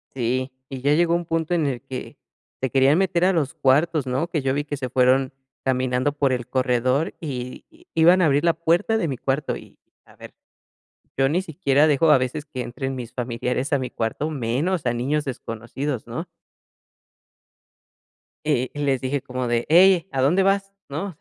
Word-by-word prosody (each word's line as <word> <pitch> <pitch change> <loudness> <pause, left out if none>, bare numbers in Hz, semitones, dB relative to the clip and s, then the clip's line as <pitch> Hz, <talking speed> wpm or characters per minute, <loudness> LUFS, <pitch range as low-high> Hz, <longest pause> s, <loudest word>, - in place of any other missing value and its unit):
Sí, 130 +1 -1 0.2
y 130 -2 -7
ya 145 +2 +3
llegó 170 +1 +3
a - - +4
un 170 0 -2
punto 165 +1 -1
en 165 -3 +1
el 130 -4 -2
que 130 -1 -8 0.4
se 130 - 0
querían 135 +4 +4
meter 180 -2 +1
a 190 - +5
los 160 -2 0
cuartos, 150 0 +2
¿no? 130 +6 -1
Que 165 -3 -2
yo 135 0 0
vi 145 +1 -1
que 145 - -4
se 130 -2 -4
fueron 130 +1 +3 0.3
caminando 130 +1 +1
por 140 -2 +1
el 120 -2 -3
corredor 130 +3 +1
y 125 -5 -5
y 340 +3 -23
iban 175 +3 +5
a - - +4
abrir 145 0 +2
la 170 - +4
puerta 170 +7 +1
de 190 - 0
mi 135 - -2
cuarto 135 +3 -1
y - - -13 0.3
a - - -20
ver, - - -12 0.8
yo 135 - +3
ni 175 +5 +1
siquiera 150 -3 +2
dejo 155 +2 +3
a 150 - +7
veces 130 +4 -3
que 135 -4 -6
entren 130 +2 -4
mis 120 -2 -7
familiares 125 +3 -2
a 140 - +3
mi 125 - -4
cuarto, 115 +7 -2
menos 140 +6 -1
a 120 - +1
niños 140 +5 -1
desconocidos, 125 +1 -5
¿no? - - -5 2.2
Eh, 130 -5 0
les 140 -3 0
dije 135 +1 -1
como 130 -1 -4
de, 120 0 0
hey, 180 +1 +6
¿a 135 -1 -1
dónde 165 +8 +3
vas? 195 0 +1 0.2
¿No? 160 +6 -4
140 Hz, 190 wpm, -23 LUFS, 130-160 Hz, 2.2 s, a